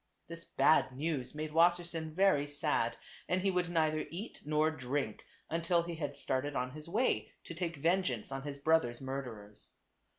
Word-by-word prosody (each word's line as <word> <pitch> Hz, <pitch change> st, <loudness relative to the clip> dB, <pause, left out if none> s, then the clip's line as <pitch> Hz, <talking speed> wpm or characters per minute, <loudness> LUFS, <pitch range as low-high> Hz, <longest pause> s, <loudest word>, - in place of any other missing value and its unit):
This 170 Hz, 0 st, -8 dB
bad 155 Hz, -, +4 dB
news 150 Hz, -3 st, -2 dB
made 155 Hz, 0 st, -3 dB
Wassersein 170 Hz, -1 st, +2 dB
very 185 Hz, -7 st, +4 dB
sad, 145 Hz, -5 st, 0 dB, 0.3 s
and 180 Hz, -, +2 dB
he 195 Hz, +1 st, +2 dB
would 180 Hz, -1 st, 0 dB
neither 155 Hz, -2 st, +1 dB
eat 195 Hz, +8 st, -7 dB
nor 155 Hz, +1 st, +2 dB
drink, 130 Hz, -5 st, -3 dB, 0.2 s
until 170 Hz, +1 st, +1 dB
he 170 Hz, 0 st, -5 dB
had 145 Hz, -3 st, -4 dB
started 140 Hz, +1 st, -1 dB
on 125 Hz, +1 st, -1 dB
his 155 Hz, +3 st, -9 dB
way 195 Hz, -, +1 dB
to -, -, -7 dB
take 170 Hz, -1 st, -3 dB
vengeance 155 Hz, -, 0 dB
on 135 Hz, 0 st, -3 dB
his 140 Hz, 0 st, -5 dB
brother's 140 Hz, -5 st, +2 dB
murderers. 125 Hz, -6 st, -6 dB
155 Hz, 165 wpm, -33 LUFS, 135-170 Hz, 0.3 s, bad